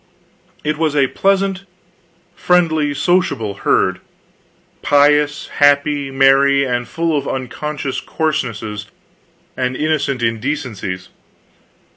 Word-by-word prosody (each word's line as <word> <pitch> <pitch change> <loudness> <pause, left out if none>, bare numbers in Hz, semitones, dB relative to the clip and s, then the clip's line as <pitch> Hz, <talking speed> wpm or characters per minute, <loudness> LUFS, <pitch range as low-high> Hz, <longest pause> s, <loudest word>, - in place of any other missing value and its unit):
It 150 0 -2
was 155 -2 0
a 140 -2 +4
pleasant, 195 0 0 0.7
friendly, 160 -5 +2
sociable 140 - 0
herd; - - +1 0.8
pious, 145 +1 +2
happy, 145 0 +3
merry 135 +1 +4
and 120 -2 -2
full 165 +4 -1
of 140 -1 -2
unconscious 135 +1 -4
coarsenesses 115 -10 -3 0.7
and 130 0 -2
innocent 145 -5 -1
indecencies. 115 -6 -3
140 Hz, 90 wpm, -17 LUFS, 125-155 Hz, 0.8 s, a